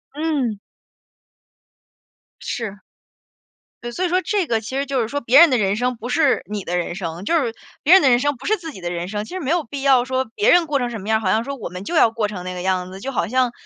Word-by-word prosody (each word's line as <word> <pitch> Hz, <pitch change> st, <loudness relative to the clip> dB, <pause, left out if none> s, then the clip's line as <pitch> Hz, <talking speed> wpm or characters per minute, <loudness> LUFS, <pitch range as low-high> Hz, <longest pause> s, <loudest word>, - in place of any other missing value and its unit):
嗯。 285 Hz, -9 st, -1 dB, 1.8 s
是。 210 Hz, -4 st, -5 dB, 1.0 s
对， 240 Hz, -, -5 dB
所 365 Hz, +10 st, -2 dB
以 -, -, 0 dB
说 365 Hz, +1 st, +2 dB
这 400 Hz, -3 st, 0 dB
个 225 Hz, -4 st, 0 dB
其 260 Hz, +5 st, -5 dB
实 275 Hz, -, 0 dB
就 270 Hz, -2 st, -1 dB
是 225 Hz, -, -1 dB
说 285 Hz, +3 st, -3 dB
别 250 Hz, +4 st, +5 dB
人 340 Hz, -1 st, +8 dB
的 255 Hz, -, +2 dB
人 200 Hz, -2 st, +1 dB
生 250 Hz, +2 st, -1 dB
不 235 Hz, -, -7 dB
是 280 Hz, +1 st, +2 dB
你 210 Hz, -1 st, -4 dB
的 180 Hz, 0 st, -2 dB
人 175 Hz, 0 st, -2 dB
生， 175 Hz, -1 st, -6 dB
就 335 Hz, -, 0 dB
是 240 Hz, -8 st, 0 dB, 0.3 s
别 330 Hz, -, +5 dB
人 380 Hz, -, +7 dB
的 265 Hz, -, +5 dB
人 240 Hz, -, +4 dB
生 290 Hz, +1 st, 0 dB
不 265 Hz, -, -12 dB
是 435 Hz, -, +3 dB
自 330 Hz, -3 st, -8 dB
己 190 Hz, -, -11 dB
的 175 Hz, -1 st, -4 dB
人 175 Hz, 0 st, -4 dB
生。 210 Hz, +1 st, -4 dB
其 -, -, -14 dB
实 375 Hz, -, -3 dB
没 285 Hz, -5 st, -4 dB
有 345 Hz, -1 st, +1 dB
必 275 Hz, +1 st, -7 dB
要 265 Hz, -3 st, +4 dB
说 260 Hz, 0 st, 0 dB
别 205 Hz, -, +3 dB
人 345 Hz, -2 st, +4 dB
过 290 Hz, -, +1 dB
成 245 Hz, -2 st, -2 dB
什 225 Hz, -4 st, -6 dB
么 205 Hz, -, -7 dB
样 220 Hz, -, +4 dB
儿， -, -, -9 dB
好 185 Hz, -3 st, +1 dB
像 225 Hz, +1 st, +2 dB
说 280 Hz, +1 st, -5 dB
我 235 Hz, -, -6 dB
们 180 Hz, +2 st, -8 dB
就 340 Hz, -, -4 dB
要 230 Hz, -7 st, +5 dB
过 225 Hz, -2 st, -1 dB
成 190 Hz, -4 st, -7 dB
那 185 Hz, -, -4 dB
个 180 Hz, -, -5 dB
样 185 Hz, -1 st, -1 dB
子。 190 Hz, -, -9 dB
就 270 Hz, +6 st, -5 dB
好 245 Hz, -, -1 dB
像 255 Hz, +1 st, +1 dB
240 Hz, 305 characters per minute, -21 LUFS, 205-280 Hz, 1.8 s, 人